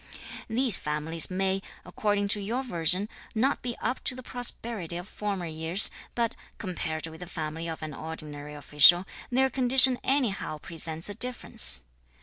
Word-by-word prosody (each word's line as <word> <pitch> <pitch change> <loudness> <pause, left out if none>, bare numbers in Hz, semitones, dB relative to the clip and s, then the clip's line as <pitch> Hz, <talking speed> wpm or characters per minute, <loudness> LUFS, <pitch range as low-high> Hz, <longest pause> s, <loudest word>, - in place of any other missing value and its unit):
(These 235 -3 +3
families) 150 +2 +1
may, 190 +1 0 0.2
according 205 -1 -1
to 205 0 +1
your 235 +6 -2
version, 180 -2 +1 0.3
not 265 +6 +1
be 240 -1 -3
up 255 - -2
to 255 - -2
the 255 - -9
prosperity 230 -8 -5
of 180 +2 -7
former 200 -4 -4
years, 160 +4 +2 0.2
but, 235 -2 0 0.2
compared 160 -4 -3
with 160 0 -10
the 180 - -8
family 160 -1 -5
of 160 -1 -6
an 155 -1 -5
ordinary 150 -1 -8
official, 150 +5 +6 0.2
their 265 +1 +2
condition 260 0 +6
anyhow 240 - 0
presents 160 +1 -5
a 205 - -2
difference. 245 - +2
185 Hz, 150 wpm, -27 LUFS, 160-235 Hz, 0.3 s, official